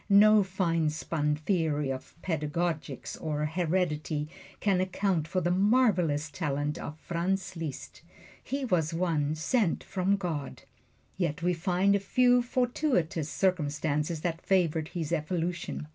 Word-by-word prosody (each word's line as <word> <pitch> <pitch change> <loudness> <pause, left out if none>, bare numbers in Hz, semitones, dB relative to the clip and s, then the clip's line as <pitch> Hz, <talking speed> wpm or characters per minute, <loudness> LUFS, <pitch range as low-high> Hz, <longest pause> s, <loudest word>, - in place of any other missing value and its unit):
No 210 +1 +7
finespun 165 -5 0
theory 150 -4 0
of 130 -1 -7
pedagogics 155 -3 -2
or 150 -1 -1
heredity 155 -2 -1 0.3
can 195 -3 +2
account 185 -3 0
for 185 +1 -1
the 175 +1 +1
marvelous 180 - +2
talent 145 -2 -2
of 150 - -6
Franz 185 +4 -2
Liszt 160 -5 -6 0.4
he 275 0 -3
was 165 -7 +1
one 155 -4 0
sent 180 +4 +1
from 195 +1 +1
God. 165 -8 -4 0.5
Yet 170 -3 -1
we 180 +1 +2
find 185 +3 +2
a - - +2
few 245 +4 +4
fortuitous 240 - 0
circumstances 155 -3 0
that 165 0 -2
favored 165 -5 +1
his 165 -3 -4
evolution. 165 - -2
170 Hz, 125 wpm, -29 LUFS, 150-190 Hz, 0.5 s, No